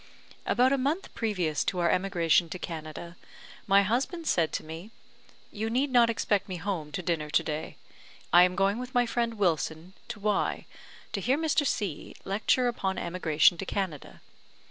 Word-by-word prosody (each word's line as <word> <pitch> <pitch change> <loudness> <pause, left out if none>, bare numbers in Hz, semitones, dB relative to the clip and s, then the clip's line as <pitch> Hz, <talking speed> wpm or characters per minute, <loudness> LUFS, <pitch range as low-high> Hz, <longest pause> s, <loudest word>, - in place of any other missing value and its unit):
About 255 +2 +3
a 275 - +1
month 295 +8 -2
previous 180 -10 -1
to 185 - -1
our 170 -1 +2
emigration 175 -3 +2
to 185 - -5
Canada, 165 0 -7 0.5
my 200 0 +5
husband 265 - -1
said 170 - +1
to - - -2
me, 160 +6 -8 0.6
"You 220 +1 -3
need 260 +4 0
not 240 -2 +5
expect 210 -3 0
me 185 - -3
home 170 -4 -4
to 185 - -3
dinner 160 -3 -1
to 155 - +2
day; 155 0 -4 0.6
I 175 - +9
am 180 0 +4
going 195 +3 +1
with 250 +1 -7
my 245 0 +4
friend 235 -1 -1
Wilson 170 -2 -1
to 235 -2 -7
Y, 205 -1 0 0.5
to 200 - -2
hear 255 +7 +2
Mr. 310 -2 +1
C 200 -12 -3
lecture 215 +5 +1
upon 190 -6 -2
emigration 170 -1 +2
to 195 - -3
Canada. 185 -8 -4
195 Hz, 170 wpm, -28 LUFS, 170-235 Hz, 0.6 s, I